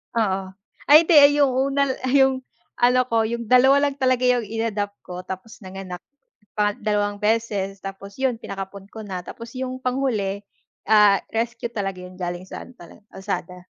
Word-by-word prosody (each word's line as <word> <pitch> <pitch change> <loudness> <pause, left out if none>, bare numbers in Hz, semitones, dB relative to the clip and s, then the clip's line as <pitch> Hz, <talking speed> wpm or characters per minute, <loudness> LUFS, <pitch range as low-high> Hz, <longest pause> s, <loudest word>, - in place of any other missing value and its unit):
Oo, 190 -4 0 0.4
ay 315 +2 +8
hindi 290 -3 +7
yung 275 -2 +4
una, 275 +1 +1 0.2
yung 265 -2 +3 0.3
ano 250 +1 +3
ko, 225 -2 +2
yung 235 0 -3
2 265 +3 +6
lang 285 -1 0
talaga 255 -2 +1
yung 245 -2 +3
inadopt 210 -2 -3
ko, 180 0 -8
tapos 190 +3 -9
nanganak 185 -1 -8 0.5
pa 205 -1 0
2 205 -1 -1
beses 205 -3 0
tapos 200 +3 -9
yun 260 -3 +1
pinakapon 195 -2 -8
ko 220 - -9
na, 180 -2 -5
tapos 230 +5 -10
yung 255 0 -4
panghuli 235 -7 -1 0.5
ah, 210 -2 +6
rescue 235 +1 -3
talaga 195 -4 -4
yun 185 +1 -12
galing 175 0 -4
sa 190 - -9
ano 255 - -17 0.3
kalsada. 180 -2 -6
220 Hz, 155 wpm, -23 LUFS, 195-255 Hz, 0.5 s, ay